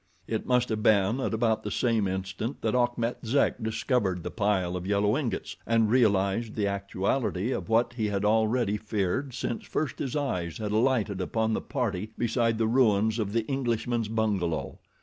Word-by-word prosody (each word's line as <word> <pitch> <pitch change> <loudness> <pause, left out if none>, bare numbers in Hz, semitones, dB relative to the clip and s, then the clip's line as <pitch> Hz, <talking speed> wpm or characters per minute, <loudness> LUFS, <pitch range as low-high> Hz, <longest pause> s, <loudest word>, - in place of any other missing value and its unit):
It 110 -1 -3
must 125 -1 +2
have 110 -1 -1
been 105 +3 +3
at - - -1
about 110 -1 +1
the 105 - -4
same 115 -2 +1
instant 95 +6 -4
that 110 - +1
Achmet 120 -1 0
Zek 125 +1 +1
discovered 110 -5 0
the - - -4
pile 100 -4 0
of 90 0 -4
yellow 105 +1 +2
ingots 135 -5 -3
and 115 -2 +3
realized 105 -2 +2
the 105 - 0
actuality 100 +2 -1
of - - -3
what 115 +2 +2
he 110 -3 -1
had 100 0 -1
already 110 0 +2
feared 110 +5 -2
since 120 - -3
first 155 - -3
his 135 -1 -3
eyes 90 - -2
had 105 -2 -3
alighted 110 -4 +1
upon 110 +4 0
the - - -1
party 110 -5 -3
beside 115 -1 +1
the 115 - +1
ruins 110 -2 +3
of 105 -2 -1
the 115 0 0
Englishman's 120 -3 -1
bungalow. 105 -7 -1
110 Hz, 175 wpm, -28 LUFS, 100-120 Hz, -, been